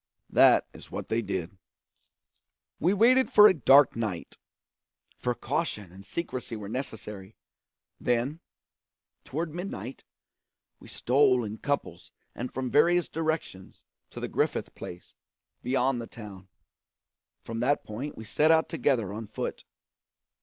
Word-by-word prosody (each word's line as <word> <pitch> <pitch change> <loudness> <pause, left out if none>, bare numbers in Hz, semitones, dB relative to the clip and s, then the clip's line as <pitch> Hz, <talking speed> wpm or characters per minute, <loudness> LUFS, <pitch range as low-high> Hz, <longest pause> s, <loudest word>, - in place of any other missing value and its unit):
That - - +6
is - - -13
what - - -6
they 115 +1 +1
did. 95 -3 -4 1.2
We 175 - +3
waited 245 +6 +4
for 210 0 +9
a - - +5
dark 140 -2 +6
night, 110 -7 -4 0.8
for 125 -1 -2
caution 105 - -3
and 95 +2 -13
secrecy 125 -1 -5
were 105 -2 -7
necessary; 105 -5 -6 0.6
then, 125 +6 0 0.8
toward 160 +3 -4
midnight, 135 - -6 0.8
we - - -14
stole 130 -1 +3
in 110 0 -6
couples 145 0 -3 0.2
and 125 +1 -5
from 130 -1 -3
various 175 +3 +4
directions 155 - -4 0.3
to - - -9
the - - -3
Griffith - - -1
place, 85 - -10 0.5
beyond 125 0 +1
the 115 - -7
town; 100 -5 -11 1.0
from 115 0 -5
that 135 +5 +1
point 125 +8 -6
we 110 - -7
set 150 +8 +2
out 160 0 +4
together 110 -7 0
on 110 +1 -6
foot. - - -5
125 Hz, 130 wpm, -28 LUFS, 105-150 Hz, 1.2 s, for